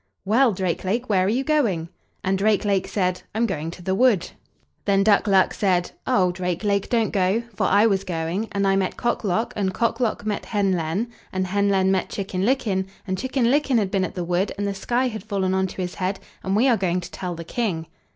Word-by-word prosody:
"Well, 235 Hz, +5 st, +4 dB
Drake 185 Hz, -3 st, -2 dB
lake, 225 Hz, +6 st, -1 dB
where 190 Hz, -3 st, +3 dB
are -, -, +1 dB
you 250 Hz, +5 st, +1 dB
going?" 230 Hz, -, +1 dB, 0.3 s
And 190 Hz, +1 st, +1 dB
Drake 210 Hz, +2 st, +2 dB
lake 195 Hz, -2 st, +1 dB
said: 185 Hz, -2 st, -1 dB
"I'm 230 Hz, +2 st, +2 dB
going 165 Hz, -7 st, -3 dB
to 175 Hz, +1 st, -10 dB
the 190 Hz, -, 0 dB
wood." 215 Hz, -3 st, +3 dB, 0.5 s
Then 195 Hz, -1 st, +3 dB
Duck 210 Hz, +1 st, +4 dB
luck 195 Hz, -2 st, +4 dB
said: 180 Hz, -3 st, +1 dB, 0.2 s
"Oh! 190 Hz, -8 st, +3 dB
Drake 180 Hz, +1 st, -3 dB
lake, 200 Hz, -1 st, 0 dB
don't 230 Hz, -3 st, +1 dB
go, 195 Hz, +3 st, +1 dB
for -, -, +1 dB
I 205 Hz, +3 st, +5 dB
was 195 Hz, -3 st, +2 dB
going, 175 Hz, +3 st, -2 dB
and 200 Hz, -1 st, 0 dB
I 195 Hz, -, +3 dB
met 190 Hz, -1 st, -1 dB
Cock 240 Hz, -1 st, -1 dB
lock, 215 Hz, +3 st, 0 dB
and 190 Hz, -3 st, -1 dB
Cock 230 Hz, +2 st, 0 dB
lock 230 Hz, -3 st, -1 dB
met 210 Hz, -2 st, -2 dB
Hen 200 Hz, -3 st, +1 dB
len, 180 Hz, +6 st, -1 dB, 0.2 s
and 185 Hz, 0 st, -1 dB
Hen 200 Hz, +2 st, +1 dB
len 190 Hz, -1 st, +3 dB
met 190 Hz, -1 st, 0 dB
Chicken 190 Hz, -2 st, -3 dB
licken, 210 Hz, -6 st, +1 dB, 0.2 s
and 190 Hz, -2 st, -1 dB
Chicken 260 Hz, +4 st, -1 dB
licken 280 Hz, -3 st, +2 dB
had 200 Hz, -4 st, 0 dB
been 195 Hz, -2 st, +1 dB
at -, -, -4 dB
the 180 Hz, -, -2 dB
wood, 175 Hz, +3 st, 0 dB
and 205 Hz, -, -2 dB
the 200 Hz, -, -1 dB
sky 240 Hz, +6 st, 0 dB
had 220 Hz, -4 st, -5 dB
fallen 195 Hz, -3 st, -1 dB
on 190 Hz, 0 st, +1 dB
to 185 Hz, -, -6 dB
his 180 Hz, -, -4 dB
head, 190 Hz, +1 st, -2 dB, 0.2 s
and 190 Hz, +1 st, 0 dB
we 235 Hz, +6 st, +4 dB
are 240 Hz, -4 st, +4 dB
going 180 Hz, -2 st, 0 dB
to 180 Hz, 0 st, -8 dB
tell 180 Hz, -2 st, -4 dB
the 165 Hz, -, -7 dB
King." 175 Hz, -4 st, -2 dB
195 Hz, 235 wpm, -23 LUFS, 185-220 Hz, 0.5 s, I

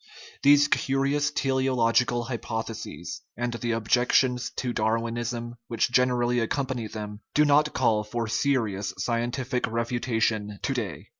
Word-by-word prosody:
These 145 Hz, +1 st, +6 dB
curious 140 Hz, +1 st, +1 dB
teleological 125 Hz, -3 st, +1 dB
hypotheses, 115 Hz, -2 st, -5 dB, 0.2 s
and 120 Hz, 0 st, -2 dB
the 120 Hz, 0 st, -2 dB
objections 125 Hz, +2 st, +2 dB
to 125 Hz, -2 st, -2 dB
Darwinism 115 Hz, +2 st, -2 dB
which 115 Hz, +1 st, 0 dB
generally 125 Hz, -1 st, +2 dB
ac 115 Hz, -, 0 dB
company 130 Hz, -5 st, -2 dB
them, 105 Hz, -1 st, -7 dB, 0.2 s
do 150 Hz, -, +5 dB
not 150 Hz, +1 st, +4 dB
call 110 Hz, -4 st, +2 dB
for 115 Hz, +2 st, -3 dB
serious 110 Hz, -6 st, 0 dB
scientific 120 Hz, +4 st, -1 dB
refu 115 Hz, +2 st, -2 dB
tation 110 Hz, -4 st, -1 dB
to 135 Hz, -, 0 dB
day. 110 Hz, -9 st, -5 dB
120 Hz, 130 wpm, -26 LUFS, 115-130 Hz, 0.2 s, These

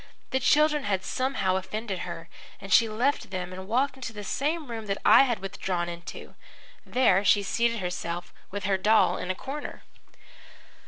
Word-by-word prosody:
The 265 Hz, -, +2 dB
children 300 Hz, +2 st, +3 dB
had 190 Hz, -2 st, 0 dB
somehow 255 Hz, -8 st, 0 dB
offended 195 Hz, +1 st, -4 dB
her, 170 Hz, -1 st, -6 dB, 0.3 s
and 195 Hz, -, -3 dB
she 230 Hz, -, +6 dB
left 245 Hz, +7 st, 0 dB
them 185 Hz, -1 st, -4 dB
and 190 Hz, +1 st, -8 dB
walked 255 Hz, +5 st, +1 dB
into 250 Hz, -4 st, -6 dB
the 210 Hz, -1 st, -7 dB
same 295 Hz, -, -2 dB
room 225 Hz, -2 st, -5 dB
that 195 Hz, 0 st, -1 dB
I -, -, +8 dB
had 240 Hz, -4 st, 0 dB
withdrawn 185 Hz, -2 st, -3 dB
into. 170 Hz, 0 st, -8 dB, 0.5 s
There 215 Hz, -7 st, +3 dB
she 205 Hz, 0 st, +4 dB
seated 230 Hz, +4 st, +1 dB
herself 175 Hz, -1 st, -4 dB, 0.2 s
with 200 Hz, +1 st, -5 dB
her 195 Hz, -1 st, +1 dB
doll 215 Hz, +3 st, +4 dB
in 180 Hz, -, -5 dB
a 185 Hz, -, 0 dB
corner. 280 Hz, +8 st, -7 dB
205 Hz, 170 wpm, -27 LUFS, 185-250 Hz, 0.5 s, I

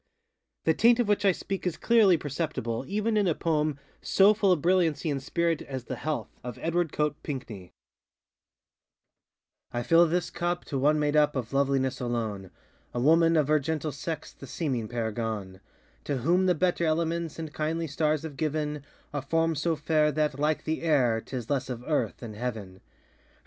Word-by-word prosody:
The 160 Hz, -, +3 dB
taint 235 Hz, +7 st, +4 dB
of 240 Hz, -, +2 dB
which 205 Hz, 0 st, +1 dB
I 195 Hz, -, +6 dB
speak 190 Hz, +1 st, -4 dB
is 170 Hz, -, -2 dB
clearly 215 Hz, -7 st, +5 dB
perceptible 140 Hz, -6 st, -3 dB
even 215 Hz, +2 st, 0 dB
in 205 Hz, -2 st, +2 dB
a 165 Hz, -, +2 dB
poem 155 Hz, -3 st, 0 dB, 0.2 s
so 200 Hz, +2 st, +5 dB
full 205 Hz, -3 st, +2 dB
of 180 Hz, -, +3 dB
brilliancy 165 Hz, -2 st, +2 dB
and 140 Hz, -1 st, -2 dB
spirit 170 Hz, +2 st, 0 dB
as 130 Hz, -3 st, -6 dB
ŌĆ£The -, -, -5 dB
HealthŌĆØ 145 Hz, -9 st, -3 dB, 0.2 s
of 125 Hz, 0 st, -6 dB
Edward 170 Hz, -1 st, 0 dB
Coate 150 Hz, -1 st, -1 dB
Pinckney:ŌĆö 110 Hz, -, -7 dB, 2.1 s
I -, -, -2 dB
fill 170 Hz, +4 st, +5 dB
this 175 Hz, +2 st, -1 dB
cup 175 Hz, 0 st, -2 dB
to 140 Hz, -, -3 dB
one 150 Hz, +3 st, +3 dB
made 150 Hz, 0 st, +1 dB
up 150 Hz, -1 st, +4 dB
Of 125 Hz, -1 st, -4 dB
loveliness 135 Hz, -2 st, +1 dB
alone, 110 Hz, -6 st, -3 dB, 0.5 s
A -, -, 0 dB
woman, 165 Hz, +5 st, +4 dB
of 150 Hz, -3 st, +2 dB
her 155 Hz, 0 st, +4 dB
gentle 155 Hz, +1 st, -2 dB
sex 155 Hz, +3 st, -5 dB
The 135 Hz, -, -12 dB
seeming 130 Hz, -6 st, -2 dB
paragon; 110 Hz, -4 st, -4 dB, 0.4 s
To 145 Hz, -, -1 dB
whom 175 Hz, +9 st, +2 dB
the 180 Hz, -, +3 dB
better 175 Hz, +1 st, +1 dB
elements 165 Hz, 0 st, -1 dB
And 160 Hz, -2 st, -6 dB
kindly 160 Hz, +2 st, -1 dB
stars 155 Hz, 0 st, 0 dB
have 150 Hz, -4 st, -7 dB
given 150 Hz, -2 st, -2 dB, 0.3 s
A 145 Hz, -, -2 dB
form 165 Hz, +4 st, +1 dB
so 160 Hz, +2 st, 0 dB
fair 150 Hz, 0 st, +2 dB
that, 150 Hz, -1 st, 0 dB
like 150 Hz, +1 st, +1 dB
the 160 Hz, 0 st, -2 dB
air, 125 Hz, -9 st, +2 dB
ŌĆÖTis 125 Hz, -4 st, -6 dB
less 135 Hz, -2 st, -1 dB
of 125 Hz, -1 st, -5 dB
earth 130 Hz, -9 st, 0 dB
than 115 Hz, -3 st, -8 dB
heaven. 105 Hz, -5 st, -5 dB
150 Hz, 180 wpm, -28 LUFS, 130-165 Hz, 2.1 s, I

